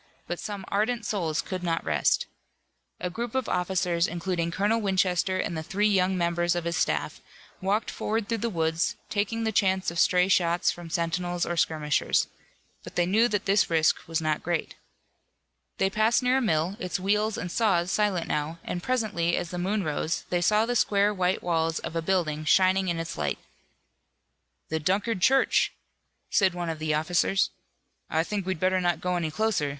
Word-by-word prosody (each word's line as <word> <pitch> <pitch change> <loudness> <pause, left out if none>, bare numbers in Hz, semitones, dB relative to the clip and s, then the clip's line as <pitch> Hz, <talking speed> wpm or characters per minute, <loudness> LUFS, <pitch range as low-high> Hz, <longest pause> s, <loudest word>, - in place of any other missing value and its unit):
But 175 - -4
some 200 -2 -6
ardent 220 +3 0
souls 165 -8 -1
could 185 -1 -5
not 165 -2 -1
rest. 75 -3 +2 0.7
A 180 - -3
group 235 +4 -5
of 260 -2 0
officers, 180 -1 0
including 170 0 -2
Colonel 205 +6 +1
Winchester 185 -1 +1
and 175 - -2
the 160 - -3
three 200 +6 0
young 190 -2 +2
members 175 0 +1
of 175 - -2
his 170 0 -2
staff, 160 - -1 0.4
walked 200 +4 0
forward 220 -1 -2
through 230 -1 -1
the 235 - -1
woods, 160 -3 0 0.2
taking 220 +2 -1
the 220 - 0
chance 190 -3 +1
of 170 - -4
stray 180 0 +4
shots 175 -2 +2
from 175 -1 -9
sentinels 175 +1 -1
or 175 - -2
skirmishers. 155 -3 +1 0.6
But - - -11
they 175 - +2
knew 215 +6 +3
that 205 -4 -1
this 200 +1 +3
risk 160 -1 +2
was 165 0 -1
not 155 -1 -1
great. 175 -2 -2 1.0
They 195 - +2
passed 220 +5 +2
near 250 +1 +3
a - - +1
mill, 175 -2 0
its 180 +1 -3
wheels 210 +3 +1
and 180 - -4
saws 190 -5 +1
silent 205 -5 +1
now, 150 +2 -2
and 175 - -4
presently 210 -9 0
as 170 - -3
the 180 - -4
moon 200 +3 0
rose 155 +1 -2
they 175 -1 +1
saw 210 +4 +3
the 245 +1 -1
square 205 -2 +3
white 185 -1 0
walls 165 -2 0
of - - -5
a 165 - 0
building 160 -4 0
shining 190 +3 +3
in 170 -2 0
its 165 - -5
light. 75 -2 -1 1.3
"The 160 - -1
Dunkard 195 +5 0
church," 270 +7 +3 0.6
said 190 -4 +3
one 175 -1 -3
of 160 - -7
the 155 -1 0
officers. 175 +5 +1 0.6
"I 160 +1 +1
think 200 +1 -4
we'd 190 -4 -2
better 185 +1 +2
not 175 -1 +1
go 180 0 -1
any 170 -3 -1
closer. 180 -4 0
180 Hz, 185 wpm, -27 LUFS, 170-205 Hz, 1.3 s, stray